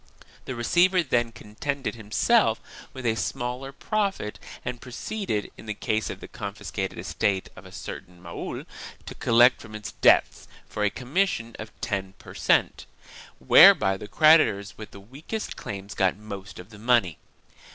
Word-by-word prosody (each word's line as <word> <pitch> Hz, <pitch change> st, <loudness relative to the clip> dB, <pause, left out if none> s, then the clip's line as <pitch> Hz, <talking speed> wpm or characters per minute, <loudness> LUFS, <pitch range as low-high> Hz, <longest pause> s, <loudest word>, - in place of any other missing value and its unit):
The 130 Hz, -, -5 dB
receiver 175 Hz, +9 st, +3 dB
then 120 Hz, -5 st, 0 dB
contented 130 Hz, +5 st, -4 dB
himself 110 Hz, -3 st, +2 dB, 0.3 s
with 130 Hz, -1 st, -8 dB
a 115 Hz, -, +3 dB
smaller 125 Hz, +4 st, -3 dB
profit 195 Hz, -, -2 dB, 0.3 s
and 125 Hz, -1 st, -4 dB
proceeded, 125 Hz, -, -4 dB
in 110 Hz, -, -12 dB
the 105 Hz, -, -3 dB
case 110 Hz, +1 st, -1 dB
of -, -, -7 dB
the -, -, -8 dB
confiscated 100 Hz, -1 st, -5 dB
estate 95 Hz, -2 st, -1 dB
of -, -, -12 dB
a -, -, -14 dB
certain 90 Hz, 0 st, -9 dB
Mahul, 85 Hz, -1 st, -6 dB, 0.4 s
to -, -, -7 dB
collect 120 Hz, +2 st, +4 dB
from 110 Hz, -1 st, -11 dB
it 105 Hz, -1 st, -7 dB
debts -, -, +4 dB, 0.2 s
for 105 Hz, -, -3 dB
a 105 Hz, -, +3 dB
commission 125 Hz, -, -1 dB
of 110 Hz, -, -7 dB
ten 100 Hz, -4 st, -3 dB
per -, -, -12 dB
cent., -, -, +1 dB, 0.5 s
whereby 95 Hz, +8 st, +7 dB
the 105 Hz, -, -8 dB
creditors 105 Hz, -11 st, +4 dB
with 110 Hz, -, -9 dB
the 100 Hz, -, -12 dB
weakest 140 Hz, -, -6 dB
claims 100 Hz, 0 st, -7 dB
got 95 Hz, 0 st, +1 dB
most 100 Hz, -3 st, -9 dB
of 90 Hz, +4 st, -11 dB
the 105 Hz, -, -13 dB
money. 115 Hz, -7 st, +2 dB
110 Hz, 155 wpm, -26 LUFS, 100-130 Hz, 0.5 s, whereby